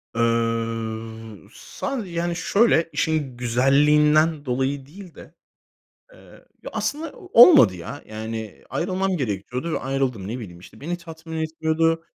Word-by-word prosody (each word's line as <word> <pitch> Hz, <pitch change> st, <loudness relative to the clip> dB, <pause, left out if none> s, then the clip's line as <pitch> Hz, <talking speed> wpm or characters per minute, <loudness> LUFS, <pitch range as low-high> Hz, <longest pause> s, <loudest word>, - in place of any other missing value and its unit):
Iıı, 115 Hz, -2 st, -2 dB
sadece, 245 Hz, -9 st, -5 dB
yani, 170 Hz, 0 st, -2 dB
şöyle, 180 Hz, -3 st, +2 dB
işin 150 Hz, -6 st, -1 dB
güzelliğinden 150 Hz, +5 st, +3 dB
dolayı 130 Hz, +2 st, -1 dB
değil 180 Hz, +3 st, -13 dB
de, -, -, -14 dB, 0.8 s
eee -, -, -18 dB, 0.2 s
Ya, -, -, -7 dB
aslında 310 Hz, +3 st, -3 dB
olmadı, 325 Hz, -, +6 dB
ya. 110 Hz, -, -8 dB
Yani, 110 Hz, -1 st, -7 dB
ayrılmam 185 Hz, +6 st, -1 dB
gerekiyordu 125 Hz, -, -3 dB
ve -, -, 0 dB
ayrıldım. 130 Hz, -7 st, -2 dB
Ne 120 Hz, +3 st, -4 dB
bileyim, 90 Hz, -7 st, -9 dB
işte, 110 Hz, -, -15 dB
beni 175 Hz, +4 st, -3 dB
tatmin 160 Hz, -1 st, -9 dB
etmiyordu. 165 Hz, +1 st, 0 dB
140 Hz, 125 wpm, -23 LUFS, 115-165 Hz, 0.8 s, olmadı